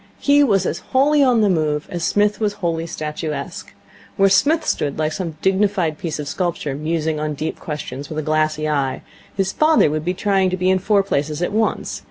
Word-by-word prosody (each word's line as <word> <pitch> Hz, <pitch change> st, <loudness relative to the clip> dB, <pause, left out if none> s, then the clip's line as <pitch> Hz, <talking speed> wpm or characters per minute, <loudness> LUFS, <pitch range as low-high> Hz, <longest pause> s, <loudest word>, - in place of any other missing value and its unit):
He 285 Hz, 0 st, +4 dB
was 195 Hz, -8 st, +2 dB
as -, -, -2 dB
wholly 285 Hz, +3 st, +2 dB
on 245 Hz, -4 st, +4 dB
the 210 Hz, -, +4 dB
move 155 Hz, -5 st, 0 dB
as 175 Hz, -2 st, -3 dB
Psmith 205 Hz, +4 st, +1 dB
was 210 Hz, -2 st, 0 dB
wholly 170 Hz, -5 st, -2 dB
statuesque. 155 Hz, -1 st, -5 dB, 0.5 s
Where 195 Hz, 0 st, +5 dB
Psmith 305 Hz, -, +3 dB
stood 140 Hz, -1 st, -1 dB
like 155 Hz, 0 st, 0 dB
some 165 Hz, -4 st, -5 dB
dignified 190 Hz, -5 st, +1 dB
piece 165 Hz, -3 st, -3 dB
of 150 Hz, -1 st, -5 dB
sculpture, 170 Hz, -3 st, -2 dB
musing 155 Hz, +1 st, -2 dB
on 150 Hz, 0 st, -2 dB
deep 155 Hz, +3 st, -4 dB
questions 145 Hz, -2 st, -6 dB
with 155 Hz, -, -6 dB
a 155 Hz, -, -1 dB
glassy 155 Hz, 0 st, 0 dB
eye, 140 Hz, -3 st, -1 dB, 0.3 s
his 190 Hz, -1 st, +1 dB
father 310 Hz, -, +3 dB
would 155 Hz, 0 st, -2 dB
be 180 Hz, +3 st, -1 dB
trying 195 Hz, -1 st, +1 dB
to 185 Hz, -, -2 dB
be 185 Hz, +1 st, +2 dB
in 190 Hz, -, +2 dB
four 200 Hz, +1 st, +2 dB
places 150 Hz, -3 st, -2 dB
at -, -, -1 dB
once. 220 Hz, +1 st, -1 dB
170 Hz, 205 wpm, -20 LUFS, 155-200 Hz, 0.5 s, Where